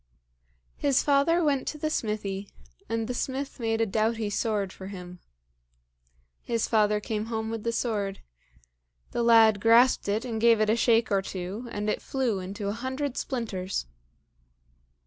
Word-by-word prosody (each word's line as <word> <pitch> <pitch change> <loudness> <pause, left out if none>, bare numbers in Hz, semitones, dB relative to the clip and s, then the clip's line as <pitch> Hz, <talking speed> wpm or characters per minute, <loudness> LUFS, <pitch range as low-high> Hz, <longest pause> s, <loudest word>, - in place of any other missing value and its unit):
His 280 -2 +2
father 300 +5 +3
went 280 -4 +1
to 305 - -3
the 310 +1 -2
smithy, 205 -5 -3 0.4
and 225 -1 -1
the 250 - -2
smith 265 +3 -3
made 225 -1 0
a - - +3
doughty 220 +1 0
sword 205 -3 -1
for 190 - -9
him. 180 -2 -9 1.2
His 230 -2 -1
father 210 -1 +3
came 215 0 -3
home 220 -1 -3
with 225 -1 -4
the 230 - 0
sword. 210 -4 -2 0.9
The - - -1
lad 225 -3 +6
grasped 230 0 +5
it 215 +4 0
and 225 -3 -3
gave 230 -1 +5
it 215 0 +3
a - - +3
shake 230 -1 +3
or 195 -1 +3
two, 190 +5 -6
and 210 -1 -3
it 210 - -1
flew 250 -7 -1
into 195 +2 -5
a - - 0
hundred 260 +3 -3
splinters. 200 - -3
225 Hz, 160 wpm, -27 LUFS, 205-240 Hz, 1.2 s, lad